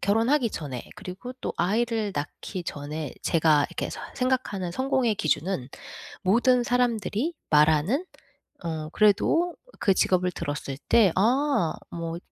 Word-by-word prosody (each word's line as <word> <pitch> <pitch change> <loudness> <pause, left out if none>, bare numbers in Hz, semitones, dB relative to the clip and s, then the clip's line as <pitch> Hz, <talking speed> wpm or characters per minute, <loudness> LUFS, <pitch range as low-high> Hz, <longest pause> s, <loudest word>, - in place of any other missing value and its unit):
결혼하기 230 +6 +2
전에 135 - -6
그리고 200 +6 -7
또 - - -3
아이를 215 +2 0
낳기 170 +5 -5
전에 150 0 -5
제가 155 -3 +3
이렇게 - - -3
서 - - -7
생각하는 250 -9 -1
성공의 260 -3 +1
기준은 155 -4 -1 0.5
모든 240 +5 +3
사람들이 245 +3 0 0.2
말하는 155 - +3 0.6
어 160 -2 -4
그래도 325 - +3 0.2
그 195 - +3
직업을 180 -1 +2
들었을 145 -4 -4
때 210 -7 +6
"아 240 - +2 0.2
뭐" 165 0 -4
195 Hz, 275 characters per minute, -26 LUFS, 160-245 Hz, 0.6 s, 때